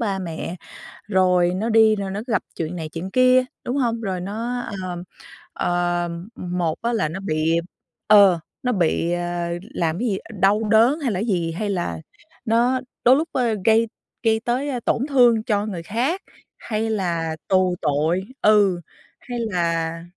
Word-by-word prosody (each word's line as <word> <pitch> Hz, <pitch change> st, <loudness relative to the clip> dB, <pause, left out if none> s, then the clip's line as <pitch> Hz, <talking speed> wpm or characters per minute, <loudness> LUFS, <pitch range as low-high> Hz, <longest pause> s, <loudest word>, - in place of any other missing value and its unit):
ba 200 Hz, -4 st, -1 dB
mẹ, 170 Hz, 0 st, -5 dB, 0.5 s
rồi 180 Hz, -3 st, +3 dB
nó 220 Hz, +4 st, -1 dB
đi 220 Hz, -1 st, +5 dB
rồi 195 Hz, -2 st, -4 dB
nó 205 Hz, -, -3 dB
gặp 210 Hz, -7 st, 0 dB
chuyện 165 Hz, +1 st, -4 dB
này 160 Hz, -3 st, -5 dB
chuyện 170 Hz, +4 st, -6 dB
kia, 255 Hz, 0 st, +5 dB, 0.2 s
đúng 250 Hz, +3 st, -2 dB
hông? 235 Hz, -4 st, 0 dB
Rồi 190 Hz, -4 st, -3 dB
nó, 225 Hz, +6 st, -3 dB, 0.2 s
ờ, 175 Hz, -1 st, -5 dB, 0.5 s
ờ, 175 Hz, 0 st, 0 dB, 0.3 s
một 175 Hz, -3 st, -2 dB
á 235 Hz, +1 st, 0 dB
là 155 Hz, -9 st, 0 dB
nó 180 Hz, +5 st, -5 dB
bị 165 Hz, -3 st, +1 dB, 0.5 s
ờ, 200 Hz, -5 st, +7 dB, 0.2 s
nó 250 Hz, -, +1 dB
bị, 170 Hz, -4 st, +1 dB
ơ, 175 Hz, 0 st, -2 dB, 0.3 s
làm 165 Hz, +2 st, -1 dB
cái 245 Hz, -, 0 dB
gì 195 Hz, -4 st, 0 dB, 0.2 s
đau 200 Hz, +3 st, +4 dB
đớn, 235 Hz, +8 st, +5 dB
hay 260 Hz, -6 st, -1 dB
là 185 Hz, -, -2 dB
cái 220 Hz, -, -2 dB
gì, 175 Hz, -6 st, 0 dB
hay 205 Hz, +5 st, -3 dB
là 175 Hz, -, -2 dB, 0.5 s
nó 240 Hz, +3 st, +2 dB, 0.2 s
đôi 250 Hz, +2 st, +7 dB
lúc, 320 Hz, +4 st, -1 dB
ơ, 235 Hz, -4 st, +1 dB
gây 225 Hz, +1 st, +4 dB, 0.4 s
gây 220 Hz, -1 st, +3 dB
tới, 245 Hz, +5 st, -1 dB
ơ, 255 Hz, -3 st, -2 dB
tổn 255 Hz, +4 st, +1 dB
thương 240 Hz, -5 st, +4 dB
cho 210 Hz, -3 st, 0 dB
người 185 Hz, -6 st, -5 dB
khác, 255 Hz, -, -1 dB, 0.4 s
hay 220 Hz, 0 st, -2 dB
là 170 Hz, -6 st, -1 dB
tù 185 Hz, -1 st, +2 dB
tội 155 Hz, +5 st, +1 dB, 0.2 s
ừ, 205 Hz, -4 st, +4 dB, 0.4 s
hay 245 Hz, -1 st, -6 dB
là, 170 Hz, -6 st, -1 dB
195 Hz, 175 wpm, -22 LUFS, 175-230 Hz, 0.5 s, ờ